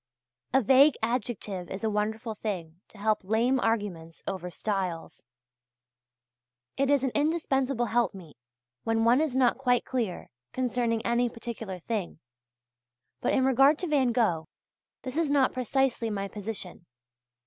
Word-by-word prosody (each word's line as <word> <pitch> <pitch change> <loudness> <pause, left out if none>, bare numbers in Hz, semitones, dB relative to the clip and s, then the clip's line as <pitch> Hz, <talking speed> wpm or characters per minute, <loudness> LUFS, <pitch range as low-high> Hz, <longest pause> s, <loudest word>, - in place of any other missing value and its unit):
A 265 0 +3
vague 270 +6 +6
adjective 225 -6 -2
is 190 +3 -6
a 220 - +2
wonderful 220 +2 -2
thing 180 -6 -5
to - - -18
help 215 +1 0
lame 230 +6 +2
arguments 200 -9 -2
over 185 -2 -4
stiles. 185 -3 -3 1.5
It 275 0 +1
is 285 -2 +3
an 265 - +1
indispensable 275 -5 +1
helpmeet 200 -9 -1 0.5
when 225 0 +1
one 245 +5 +5
is 305 -5 -1
not 255 -1 +3
quite 245 -2 +2
clear 230 -8 -3 0.2
concerning 240 -2 0
any 240 +1 +2
particular 230 -4 -6
thing: 205 -3 -3 1.0
but - - +1
in 260 -1 +3
regard 270 +3 +5
to 360 - -3
Van 275 -5 +2
Gogh, 180 -10 +1 0.6
this 260 +2 -5
is 330 -3 +1
not 280 -2 +3
precisely 255 -1 0
my 200 -2 -2
position. 195 -4 -6
230 Hz, 135 wpm, -28 LUFS, 200-260 Hz, 1.5 s, vague